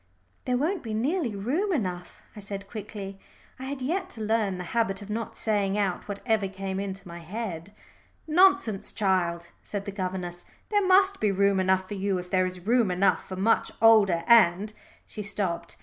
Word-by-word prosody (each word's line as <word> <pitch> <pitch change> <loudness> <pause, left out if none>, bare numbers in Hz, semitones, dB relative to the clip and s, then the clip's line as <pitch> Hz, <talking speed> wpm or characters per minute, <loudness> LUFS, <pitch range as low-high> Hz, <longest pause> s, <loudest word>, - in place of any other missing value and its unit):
"There 250 -1 +1
won't 325 +7 0
be 220 -3 -4
nearly 260 - 0
room 290 - -1
enough," 180 - -3
I - - -8
said 200 -1 -7
quickly. 200 -3 -7 0.4
I 260 - -6
had 270 -1 -5
yet 370 +7 -1
to 225 - -8
learn 215 -3 0
the 180 - -5
habit 220 -4 0
of 205 - -8
not 225 +1 -4
saying 205 -2 0
out 195 -4 -1
whatever 210 0 -1
came 190 0 -4
into 195 -1 -5
my 170 0 -8
head. 185 0 -6 0.5
"Nonsense, 315 - +3
child," 175 -4 0
said 200 -1 -5
the 200 - -4
governess. 185 -2 -4 0.3
"There 410 -2 +2
must 385 +1 +4
be 210 -2 +2
room 200 0 +2
enough 190 0 +2
for 205 - -6
you 195 -1 -1
if 180 0 -7
there 185 -1 +3
is 180 0 -7
room 235 -2 +3
enough 180 -1 +1
for 190 - -4
much 200 +5 +2
older 210 -7 +5
and 215 -3 +5 0.2
" - - -28
she 215 - -7
stopped. 195 -4 -3
200 Hz, 185 wpm, -27 LUFS, 190-230 Hz, 0.5 s, older